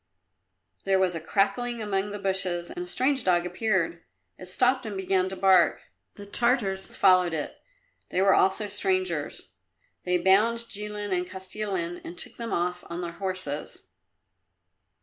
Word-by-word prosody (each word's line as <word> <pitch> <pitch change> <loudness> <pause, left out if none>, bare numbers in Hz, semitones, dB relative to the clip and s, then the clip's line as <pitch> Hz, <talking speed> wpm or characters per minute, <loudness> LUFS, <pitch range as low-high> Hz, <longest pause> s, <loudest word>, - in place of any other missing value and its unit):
There 195 0 +2
was 190 -1 +2
a 165 - -4
crackling 210 +8 0
among 205 -2 -1
the 205 - -5
bushes 190 -3 0
and 355 0 -5
a - - -10
strange 265 -3 +1
dog 175 -1 +2
appeared. 180 -2 -1 0.4
It 185 - -9
stopped 250 +7 +2
and 210 -4 -5
began 190 -1 +1
to 190 - -5
bark. 190 -2 +3 0.2
The 205 - -10
Tartars 205 -3 0
followed 180 -3 +4
it. 150 - -4 0.5
They - - -1
were 195 0 +5
also 195 +3 +2
strangers. 375 - -2 0.5
They 180 0 +1
bound 215 +6 +3
Jilin 210 -1 -3
and 180 0 -2
Kostilin 190 -2 -4
and 175 - -9
took - - -6
them 230 -1 -5
off 180 +1 -1
on 170 +1 -4
their 170 -1 -4
horses. 185 -5 -4
190 Hz, 150 wpm, -27 LUFS, 180-210 Hz, 0.5 s, were